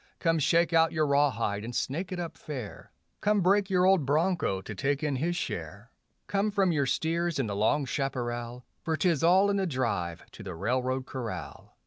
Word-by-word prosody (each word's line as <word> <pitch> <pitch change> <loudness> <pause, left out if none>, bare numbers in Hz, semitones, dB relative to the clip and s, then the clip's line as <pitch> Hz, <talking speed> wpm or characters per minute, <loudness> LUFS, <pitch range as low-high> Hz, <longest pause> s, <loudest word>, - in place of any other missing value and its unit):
Come 165 -2 +1
shake 170 +3 +3
out 165 0 +4
your 155 -2 +1
rawhide 130 -8 +1
and 120 +1 -6
snake 175 +8 -2
it 180 - -3
up 170 -2 -5
fair; 130 -9 -8 0.3
Come 210 -1 +2
break 195 +2 +3
your 185 -1 +3
old 190 -4 +4
broncho 155 - +1
to 110 - -7
take 140 +6 -1
in 145 -3 0
his 170 +6 -1
share; 100 - -5 0.3
Come 200 +1 0
from 195 -3 +2
your 145 -4 +1
steers 170 +4 0
in 135 - 0
the 100 -2 -3
long 135 +8 +2
chaparral, 120 -2 -3 0.2
For 160 -2 -1
'tis 170 -5 +1
all 190 +4 +5
in 200 - 0
the 190 -1 0
drive 115 - -2
to - - -12
the 95 -4 -6
railroad 130 +7 -1
corral. 125 -5 -7
145 Hz, 190 wpm, -28 LUFS, 120-175 Hz, 0.3 s, all